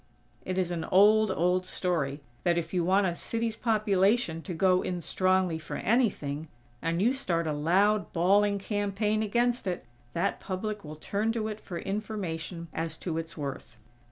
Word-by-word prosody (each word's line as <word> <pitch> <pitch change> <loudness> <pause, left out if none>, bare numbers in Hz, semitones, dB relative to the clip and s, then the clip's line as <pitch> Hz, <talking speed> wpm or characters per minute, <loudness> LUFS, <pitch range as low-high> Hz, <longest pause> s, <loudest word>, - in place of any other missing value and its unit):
It 185 0 -2
is 180 -2 0
an 165 -2 -2
old, 210 +3 +5
old 180 0 +2
story, 160 -6 -1 0.2
that 175 -1 +2
if 170 - -3
you 180 -2 +2
want 190 +3 +3
a 175 - +1
city's 225 +5 -2
population 205 -5 +2
to 180 - -6
go 185 +1 +3
in 180 -1 -2
strongly 185 -1 +1
for 160 - -6
anything, 170 - 0 0.3
and 165 +1 0
you 235 +7 +3
start 175 -11 -1
a 155 - 0
loud, 195 +8 +2
bawling 200 +4 +3
campaign 205 +1 -1
against 240 +1 +1
it, 180 -1 -3 0.3
that 185 +4 0
public 205 +2 -4
will 155 0 -8
turn 205 +8 -1
to 220 -2 -1
it 215 0 -6
for 175 - -6
information 180 -4 -4
as 160 -1 -3
to 165 -3 -3
its 165 0 -7
worth. 135 -5 -6
185 Hz, 170 wpm, -29 LUFS, 165-210 Hz, 0.3 s, old